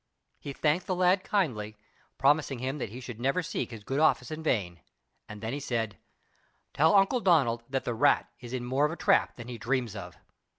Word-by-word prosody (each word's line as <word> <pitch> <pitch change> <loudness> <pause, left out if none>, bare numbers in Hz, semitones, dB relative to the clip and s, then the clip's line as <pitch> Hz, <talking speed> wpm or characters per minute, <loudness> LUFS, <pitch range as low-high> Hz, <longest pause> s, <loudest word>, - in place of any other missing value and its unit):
He 140 - -6
thanked 150 +5 0
the 185 - 0
lad 185 +1 +3
kindly, 110 - -1 0.4
promising 145 -1 +2
him 130 +4 -3
that 120 - -3
he 120 +5 -8
should 125 -3 -8
never 135 +9 0
seek - - -3
his 115 -3 -9
good 135 +6 -2
offices 155 0 +2
in 155 - -9
vain; 95 - -1 0.5
then 110 +2 -5
he 145 - -3
said: 115 -6 -2 0.8
"Tell 160 +6 +4
Uncle 195 +6 +4
Donald 140 - +3
that 135 0 -1
the 120 - -1
rat 115 - +3
is 120 -1 -10
in 125 -1 -3
more 135 +4 +2
of - - -6
a - - -4
trap 195 +2 +2
than 120 -1 -9
he 120 -2 -7
dreams 120 -2 -1
of!" 90 -4 -8
130 Hz, 205 wpm, -29 LUFS, 115-155 Hz, 0.8 s, Tell